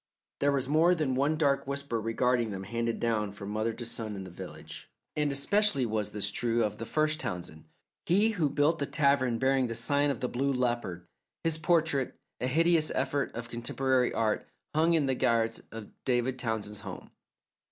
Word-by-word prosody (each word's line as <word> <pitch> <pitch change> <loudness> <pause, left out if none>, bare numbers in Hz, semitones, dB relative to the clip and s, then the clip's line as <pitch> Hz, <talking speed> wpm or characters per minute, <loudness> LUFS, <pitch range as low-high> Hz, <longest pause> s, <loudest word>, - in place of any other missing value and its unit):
There 145 0 +3
was 135 -2 0
more 160 +5 +4
than 150 -6 0
one 140 +4 +1
dark 140 -3 +2
whisper 140 -5 -2
regarding 120 +1 +1
them 95 -2 -5
handed 115 +3 -2
down 110 -3 0
from 100 0 -7
mother 110 +2 0
to 120 - -6
son 110 -2 -5
in 95 - -6
the 95 - -9
village, - - -9 0.3
and 150 -1 +1
especially 140 0 +2
was 105 -2 -1
this 105 -1 -1
true 115 +2 +1
of 105 -1 -2
the 115 - -5
first 155 0 +1
Townsend, 90 - -5 0.4
he 200 +6 +4
who 170 -9 +1
built 150 +4 +2
the 140 - -1
tavern 140 -5 +2
bearing 130 +1 +2
the 115 - -4
Sign 140 +5 +2
of 135 -5 -2
the 125 - -1
Blue 135 +3 0
Leopard. 120 -9 -1 0.4
His 160 -1 0
portrait, 160 -5 +1 0.2
a 125 - 0
hideous 165 +3 +3
effort 135 +1 0
of 115 0 -5
contemporary 125 +2 +1
art, 110 -1 0 0.3
hung 165 +2 +3
in 155 -3 +2
the 135 - +1
garret 115 -2 +1
of 115 -2 -8
David 125 0 0
Townsend's 110 -3 -2
home. 100 -5 -9
125 Hz, 185 wpm, -30 LUFS, 115-145 Hz, 0.4 s, more